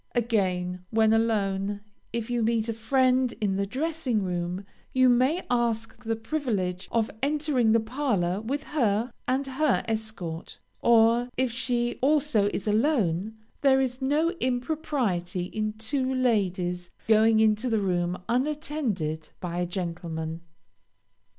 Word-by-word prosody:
Again, 185 -6 0
when 220 -1 +3
alone, 205 -3 0 0.3
if 235 -1 -3
you 240 -1 +1
meet 225 0 +1
a 230 - -1
friend 255 +2 +2
in 200 -3 0
the 200 0 0
dressing 265 -3 -1
room, 180 +1 -3 0.3
you 260 -1 +5
may 260 +8 +3
ask 235 -1 -1
the 225 -1 -1
privilege 220 - -2
of 225 -2 +1
entering 285 -5 +2
the 230 - +5
parlor 220 -6 -1
with 275 +6 -3
her 235 -5 0 0.2
and 265 +2 +1
her 270 +1 +1
escort; 215 -7 -4 0.2
or, 235 +1 +4
if 260 -1 +1
she 240 0 -1
also 280 -7 +3
is 200 - -4
alone, 215 - +1 0.2
there 270 -1 +5
is 260 0 -1
no 300 +5 +2
impropriety 245 - -1
in 215 +3 -3
two 255 +5 -1
ladies 185 -8 0 0.2
going 220 0 +5
into 220 +3 +3
the 225 -2 +2
room 180 -2 0
unattended 245 - -1
by 175 -1 -4
a 175 - 0
gentleman. 170 -2 -4
225 Hz, 130 wpm, -27 LUFS, 195-255 Hz, 0.3 s, you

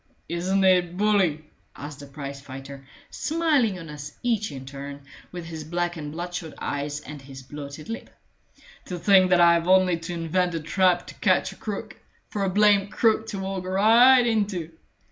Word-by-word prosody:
"Isn't 185 +3 0
it 180 -2 +3
bully?" 190 -7 +2 0.3
asked 145 0 -8
the 140 - -10
prize 140 -1 -7
fighter, 135 0 -10 0.2
smiling 300 - +1
on 165 -2 -9
us 150 -1 -8
each 225 -3 0
in 135 -2 -8
turn, 140 +1 -8 0.3
with 175 -2 -7
his 160 -1 -7
black 175 +2 -2
and 150 -3 -6
bloodshot 175 0 -6
eyes 145 +1 -3
and 150 -2 -9
his 135 -1 -11
bloated 145 +2 -9
lip. 225 +1 -6 0.8
"To 180 - -5
think 185 0 +5
that 180 -1 +4
I've 170 0 +5
only 185 -2 +4
to 165 +1 -6
invent 175 +1 0
a - - -1
trap 175 +3 +2
to - - -10
catch - - +2
a - - -12
crook, - - -6 0.3
for 205 - -2
a 195 - +1
blamed 205 0 +3
crook 220 0 +2
to 210 -2 -5
walk 190 -1 -4
right 230 +7 +6
into! 200 -8 -1
175 Hz, 175 wpm, -25 LUFS, 150-195 Hz, 0.8 s, right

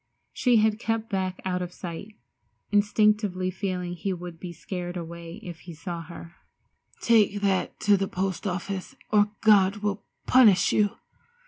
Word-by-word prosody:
She 250 -2 +2
had 215 0 +2
kept 225 -1 -2
back 185 -1 -2
out 180 -1 -1
of 180 -1 -4
sight, 180 +5 -8 0.6
instinctively 205 -2 +2
feeling 180 -2 -3
he 190 +2 -3
would 175 -2 -8
be 180 -1 -6
scared 175 +1 -6
away 170 0 -7
if 175 -2 -8
he 170 -1 -10
saw 170 +1 -5
her. 170 +1 -11 0.6
"Take 210 -3 +3
that 195 -2 0
to 205 -1 +4
the 195 0 -1
post 190 +1 -2
office 195 +5 -4 0.2
or 210 -1 +4
God 205 -1 +4
will 205 -1 -1 0.2
punish 215 -9 +5
you!" 205 -1 +2
190 Hz, 150 wpm, -26 LUFS, 175-210 Hz, 0.6 s, punish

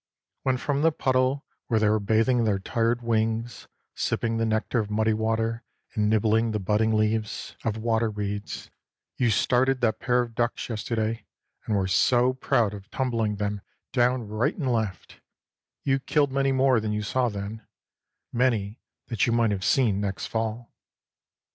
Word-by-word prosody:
When 130 -1 +1
from 140 +2 -1
the 165 +1 +4
puddle, 130 -1 +1 0.2
where 110 -3 +2
they 105 - +3
were 110 +1 +3
bathing 115 +4 +2
their 105 -3 +2
tired 115 +4 0
wings, 115 +1 -1 0.3
sipping 115 -1 -1
the 115 0 +1
nectar 110 +2 0
of 105 -2 -2
muddy 110 +1 +2
water, 115 +1 -1 0.3
and 105 -1 +1
nibbling 110 +1 +2
the 105 - 0
budding 105 +3 +1
leaves 110 0 -1
of 110 -1 -1
water 115 0 +1
weeds, 105 -1 -5 0.5
you 120 - +2
started 130 +5 +2
that 115 -3 +1
pair 125 0 +2
of 115 -1 -9
ducks 120 +1 -1
yesterday, 110 0 -2 0.4
and 110 - +1
were 95 -2 +1
so 125 +6 +3
proud 120 -5 +1
of 100 -1 -10
tumbling 115 -5 -1
them 105 0 -2 0.3
down 125 -2 +2
right 110 +3 0
and 135 -8 0
left, 110 -5 -3 0.6
you 135 0 +2
killed 145 +1 +1
many 135 0 +1
more 130 -2 +3
than 110 -1 -2
you 105 0 -1
saw 125 +4 +1
then; 105 +1 -6 0.7
many 115 -4 0 0.3
that 115 -3 0
you - - +2
might 115 -2 +3
have 95 -2 -2
seen 110 -4 +2
next 95 -7 -3
fall. 115 +1 -3
115 Hz, 165 wpm, -26 LUFS, 105-125 Hz, 0.7 s, the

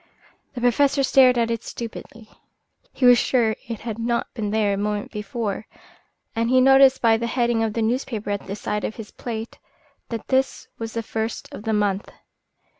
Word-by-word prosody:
The 245 - -5
Professor 275 +3 +3
stared 255 -2 +5
at 230 -1 +1
it 230 0 -3
stupidly. 230 -1 -8 0.6
He 260 - -1
was 245 -1 +8
sure 230 -4 +2
it 230 -3 -5
had 225 -1 -5
not 235 +1 -1
been 215 -4 -3
there 210 -1 +1
a - - -2
moment 205 0 -2
before, 210 0 -4 0.7
and 230 +1 0
he 255 +1 +5
noticed 270 0 +6
by 225 -1 +5
the 235 +1 -2
heading 235 -1 +1
of 220 -1 -1
the 230 - -1
newspaper 225 -3 -2
at 200 -1 -4
the 195 - -4
side 210 0 -3
of 215 - -3
his 220 -2 -9
plate 225 -1 -6 0.5
that 230 -2 -6
this 265 0 0
was 225 -1 -5
the 230 - -3
first 220 +1 -4
of 210 - -9
the 220 - 0
month. 205 -1 0
230 Hz, 190 wpm, -23 LUFS, 215-245 Hz, 0.7 s, was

